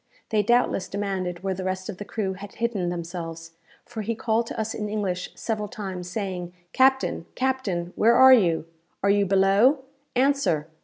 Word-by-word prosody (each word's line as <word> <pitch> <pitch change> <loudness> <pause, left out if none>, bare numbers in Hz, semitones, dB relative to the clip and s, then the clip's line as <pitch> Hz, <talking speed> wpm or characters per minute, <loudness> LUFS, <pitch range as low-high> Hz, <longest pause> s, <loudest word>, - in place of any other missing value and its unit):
They 215 -2 +2
doubtless 235 -2 +2
demanded 190 -3 -3
where 195 -1 0
the 185 0 -5
rest 185 0 -3
of 205 - -6
the 205 - -5
crew 200 -3 -2
had 195 +1 -10
hidden 225 -7 -1
themselves; 165 -1 -6 0.3
for 235 -2 -6
he 225 +2 -2
called 225 +1 0
to - - -6
us 220 0 -2
in 210 -1 -4
English 190 -4 -2
several 215 -2 -3
times, 190 -3 -6
saying, 180 -3 -4 0.2
"Captain, 265 -9 +2
captain! 210 -10 -1
where 230 +2 +4
are 260 +1 +9
you? 170 -10 +3 0.4
Are 200 - +4
you 200 -1 +2
below? 200 +9 +4 0.3
Answer! 255 - +2
200 Hz, 170 wpm, -25 LUFS, 180-230 Hz, 0.4 s, are